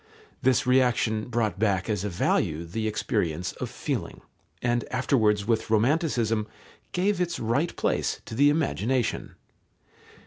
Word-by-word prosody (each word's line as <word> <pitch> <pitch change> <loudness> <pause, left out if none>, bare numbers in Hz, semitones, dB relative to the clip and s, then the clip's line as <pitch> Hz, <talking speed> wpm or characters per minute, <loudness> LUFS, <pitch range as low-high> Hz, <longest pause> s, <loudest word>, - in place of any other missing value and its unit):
This 130 -2 +3
reaction 125 -4 +2
brought 110 -4 -1
back 100 -4 +1
as 105 -4 -1
a 105 - -1
value 85 -2 0
the 110 +6 -3
experience 90 - -1
of - - -2
feeling, - - -4 0.4
and 120 -1 0
afterwards 110 -6 +2
with 115 0 0
Romanticism 115 -2 +1 0.4
gave 185 +1 +1
its 170 -1 -1
right 125 +9 0
place - - 0
to - - -8
the 140 +5 +5
imagination. 130 - 0
115 Hz, 130 wpm, -26 LUFS, 105-130 Hz, 0.4 s, the